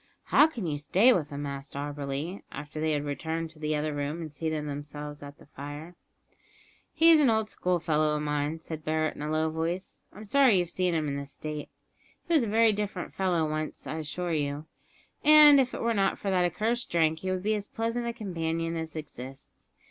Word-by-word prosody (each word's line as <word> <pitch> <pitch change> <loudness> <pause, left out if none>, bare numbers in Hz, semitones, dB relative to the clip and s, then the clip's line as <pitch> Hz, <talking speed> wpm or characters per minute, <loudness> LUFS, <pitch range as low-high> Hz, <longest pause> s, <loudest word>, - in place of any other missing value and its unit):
"How 300 - +5
can 240 - -6
you 150 -3 -2
stay 195 - +5
with 155 -5 -1
him?" 145 -1 -5
asked 140 0 -6
Auberly, 145 +4 -4
after 150 +2 -7
they 155 0 +1
had 145 0 -1
returned 160 +3 -3
to 160 - -17
the 155 0 -1
other 150 0 -1
room 145 +3 -3
and 160 -3 -7
seated 155 -1 -3
themselves 145 +1 -6
at 145 0 -10
the - - -17
fire. 145 +4 -8 1.0
"He 330 +1 +6
is 320 - +7
an 285 -4 +5
old 220 -1 +1
schoolfellow 155 -4 +1
of 150 - -2
mine," 150 +2 -1
said 160 -2 -7
Barret 155 0 0
in - - -9
a 150 - -3
low 155 0 +1
voice. 165 +4 -3
"I'm 210 +2 -11
sorry 255 -2 +5
you've 175 -1 0
seen 180 -2 0
him 155 -2 0
in 140 0 -2
this 140 0 -6
state. 150 -1 -6 0.6
He 340 - 0
was 310 - +5
a 230 - -1
very 220 +1 +4
different 205 -3 -4
fellow 175 -4 +1
once, 155 0 -4
I 160 - -4
assure 165 +3 -3
you; 145 0 -2 0.6
and 300 -1 +9
if 255 -1 +2
it - - -5
were 230 0 +2
not 195 -2 +1
for 200 - -2
that 180 -1 +3
accursed 225 +7 -1
drink 160 -1 +2
he 185 - -4
would 185 0 -2
be 215 +1 +2
as 205 -1 -3
pleasant 230 +1 -2
a 235 - -2
companion 165 -6 -2
as 160 -1 -5
exists. 135 -3 -9
160 Hz, 215 wpm, -28 LUFS, 150-195 Hz, 1.0 s, and